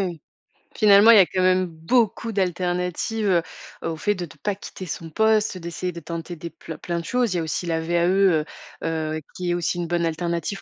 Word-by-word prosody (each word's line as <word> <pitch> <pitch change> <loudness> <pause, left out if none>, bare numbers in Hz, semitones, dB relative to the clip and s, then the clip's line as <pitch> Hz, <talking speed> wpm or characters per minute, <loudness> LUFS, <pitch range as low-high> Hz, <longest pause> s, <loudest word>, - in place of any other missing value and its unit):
oui, 175 - -3
oui. 160 - -14 0.6
Finalement, 210 +1 +7
il 225 - +8
y - - +9
a 190 - +7
quand 185 +1 -2
même 185 0 +3
beaucoup 215 +7 0
d'alternatives, 180 +3 -1
heu, 175 -3 +4 0.5
au 165 - -3
fait 205 +5 +1
de 180 -3 -5
de 155 - -16
pas 205 - +1
quitter 190 -1 -9
son 165 -1 -6
poste, 215 +1 +2
d'essayer 175 +1 -4
de 170 - -8
tenter 170 +2 -6
des 170 +1 -8
plein 160 - -9
plein 170 -1 -3
de 170 - -7
choses. 245 -3 +1
Il - - 0
y - - +1
a - - -1
aussi 160 +3 -3
la 165 -1 0
VAE, 170 +1 +1 0.2
heu 155 -3 +1 0.4
heu, 155 -1 -2
qui 180 -1 -3
est - - +2
aussi 175 0 -1
une 170 - -2
bonne 170 0 0
alternative 170 +4 -2
175 Hz, 230 wpm, -23 LUFS, 165-195 Hz, 0.6 s, y